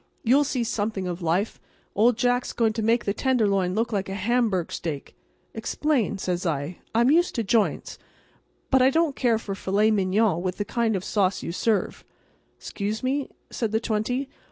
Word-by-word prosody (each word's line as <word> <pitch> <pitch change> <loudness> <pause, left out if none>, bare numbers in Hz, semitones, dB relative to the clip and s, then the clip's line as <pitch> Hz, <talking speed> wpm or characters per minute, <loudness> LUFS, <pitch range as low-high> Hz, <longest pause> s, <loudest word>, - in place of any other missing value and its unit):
You'll 265 +5 +4
see 255 -3 -1
something 210 -3 -2
of 175 0 -4
life. 175 +6 -1 0.3
Old 225 +3 +3
Jack's 245 +1 +1
going 225 -2 +1
to 225 - -3
make 230 +2 +2
the 200 - 0
Tenderloin 200 -8 +1
look 230 +1 -1
like 195 -2 -1
a 195 - -4
hamburg 210 -4 0
steak." 150 -5 -5 0.4
"Explain," 235 -1 -1
says 180 -2 -2
I. 160 0 -2 0.2
"I'm 240 +4 +4
used 345 +3 +3
to 230 - 0
joints, 215 +1 0 0.7
but 265 -1 +5
I 255 - +6
don't 320 -1 +1
care 235 -3 +2
for 210 -2 -5
filet 200 +3 +1
mignon 195 -2 +2
with 185 0 -3
the 205 - -2
kind 230 0 0
of 190 - -3
sauce 195 -2 0
you - - -3
serve." 205 +2 -1 0.6
"'Xcuse 210 +2 -4
me," 270 +2 -1 0.2
said 225 -3 -2
the 220 - +3
twenty. 235 +4 -1
220 Hz, 180 wpm, -25 LUFS, 190-240 Hz, 0.7 s, I